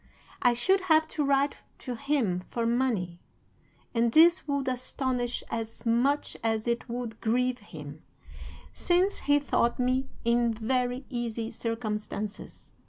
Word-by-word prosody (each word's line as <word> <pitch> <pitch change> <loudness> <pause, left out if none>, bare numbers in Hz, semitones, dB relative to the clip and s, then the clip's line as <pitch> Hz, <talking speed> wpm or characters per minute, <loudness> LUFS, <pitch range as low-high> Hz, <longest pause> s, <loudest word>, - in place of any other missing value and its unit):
I 245 -1 +4
should 380 +11 +3
have 315 0 +5
to 300 - -1
write 280 0 +2 0.2
to 250 - -5
him 245 -9 0
for 235 -1 -1
money, 230 -8 0 0.7
and 230 -1 +2
this 335 +4 +6
would 280 -2 -1
astonish 255 -1 -1
as 225 0 -5
much 250 +6 +1
as 225 0 0
it 235 +1 -1
would 235 -2 -5
grieve 250 +2 +1
him, 150 -7 -10 0.7
since 360 +3 +2
he 290 - +7
thought 240 -4 +1
me 255 +1 0 0.2
in 235 -1 +2
very 250 +3 -1
easy 230 -2 -3
circumstances. 215 -2 -5
245 Hz, 130 wpm, -28 LUFS, 225-270 Hz, 0.7 s, he